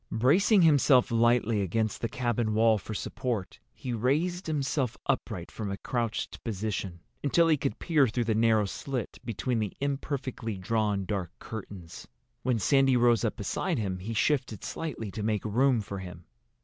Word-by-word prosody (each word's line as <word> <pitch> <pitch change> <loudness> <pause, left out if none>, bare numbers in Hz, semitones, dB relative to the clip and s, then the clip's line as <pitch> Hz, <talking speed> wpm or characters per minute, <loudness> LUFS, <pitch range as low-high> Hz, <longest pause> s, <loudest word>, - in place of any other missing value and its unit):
Bracing 175 - +4
himself 140 -6 +5
lightly 115 -2 +3
against 110 +3 -1
the 115 - -1
cabin 120 -2 -1
wall 110 -1 +4
for 110 +3 -7
support, 115 -3 -3
he 125 - -5
raised 155 - 0
himself 140 -5 -1
upright 110 -10 -2
from 105 -3 -5
a 100 - -3
crouched 115 0 -3
position, 100 -5 -3 0.2
until 165 +4 +4
he 160 - +5
could 135 -1 -2
peer 150 -6 +3
through 120 +2 -1
the 115 -1 +1
narrow 110 -1 +3
slit 125 +3 -4
between 115 +1 -2
the 105 -2 -3
imperfectly 135 -5 -3
drawn 105 0 0
dark 95 -4 -2
curtains. 95 -6 -9 0.3
When 125 -2 +1
Sandy 135 +3 +4
rose 120 -1 +4
up 110 - 0
beside 155 - -2
him 95 -5 -2
he 110 +5 -5
shifted 125 -3 0
slightly 125 -10 -5
to 110 - -5
make 105 0 -1
room 120 +3 +3
for 100 -1 -6
him. 90 -2 -9
115 Hz, 160 wpm, -29 LUFS, 105-135 Hz, 0.3 s, himself